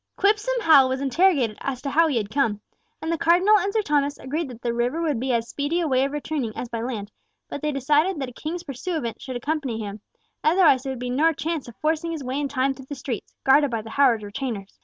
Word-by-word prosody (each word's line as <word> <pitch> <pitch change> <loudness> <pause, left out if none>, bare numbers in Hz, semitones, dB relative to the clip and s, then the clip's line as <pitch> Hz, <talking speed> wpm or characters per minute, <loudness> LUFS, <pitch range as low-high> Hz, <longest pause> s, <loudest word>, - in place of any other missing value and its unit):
Quipsome 425 +5 +2
Hal 280 -8 +6
was 260 0 -1
interrogated 275 - +2
as 270 -2 -3
to 280 - -2
how 330 +3 +4
he 285 -6 0
had 210 -2 -2
come, 225 -7 +1 0.4
and 320 - -1
the 335 - -1
Cardinal 365 +6 +5
and 395 +2 -1
Sir 435 +1 +1
Thomas 290 -3 +1
agreed 295 +3 -3
that 240 -2 -11
the 235 -1 0
river 245 +6 0
would 305 -7 0
be 260 +2 -1
as 235 -1 0
speedy 285 +7 -1
a 335 - 0
way 260 -2 +2
of 275 - -1
returning 290 -6 -3
as 245 - -4
by 230 -1 -4
land; 220 -4 -4 0.4
but 285 - -6
they 300 - 0
decided 300 +6 +2
that 265 -2 -3
a - - -13
King's 335 +7 -5
pursuivant 275 - -4
should 260 - -6
accompany 275 -2 -2
him, 205 -1 -6 0.4
otherwise 315 -5 +5
there 270 - -4
would 260 - -5
be 245 0 -3
no 315 +6 +3
chance 315 -1 -3
of 235 - -11
forcing 320 +2 0
his 310 -4 -5
way 260 +2 -2
in 290 - -1
time 270 0 0
through 265 0 -13
the 285 - -4
streets, 250 -5 -6
guarded 280 +2 +5
by 230 -3 -3
the 225 - -9
Howard 245 -5 +3
retainers. 205 -1 -5
275 Hz, 245 wpm, -24 LUFS, 245-320 Hz, 0.4 s, Hal